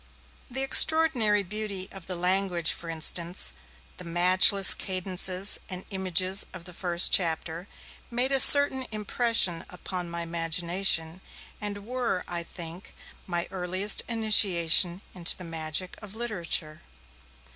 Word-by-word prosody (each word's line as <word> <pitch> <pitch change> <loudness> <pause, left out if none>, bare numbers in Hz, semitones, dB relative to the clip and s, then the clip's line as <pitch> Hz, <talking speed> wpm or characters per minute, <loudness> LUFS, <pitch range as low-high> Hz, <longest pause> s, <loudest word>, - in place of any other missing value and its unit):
The 265 +2 -6
extraordinary 270 -9 +3
beauty 200 -1 -8
of 190 -3 -13
the 185 - -5
language 180 -1 0
for 170 - -9
instance, 165 - 0 0.4
the - - -10
matchless 185 +3 +5
cadences 185 0 -2
and 185 -1 -8
images 190 0 -1
of 180 -2 -13
the 180 - -12
first 175 -1 +1
chapter 165 0 -2 0.4
made 245 +3 -1
a 270 - -1
certain 265 -1 +7
impression 215 -4 0
upon 180 -1 -8
my 170 0 -6
imagination, 170 +1 -1 0.4
and 205 -1 -8
were 240 -6 -5
(I 175 -1 -6
think) 170 +1 -10 0.3
my 175 -2 -5
earliest 185 +2 -1
initiation 190 -6 +2
into 175 -2 +3
the 185 - -8
magic 165 +2 -6
of 210 -1 -12
literature. 170 -9 -4
185 Hz, 125 wpm, -24 LUFS, 170-210 Hz, 0.4 s, certain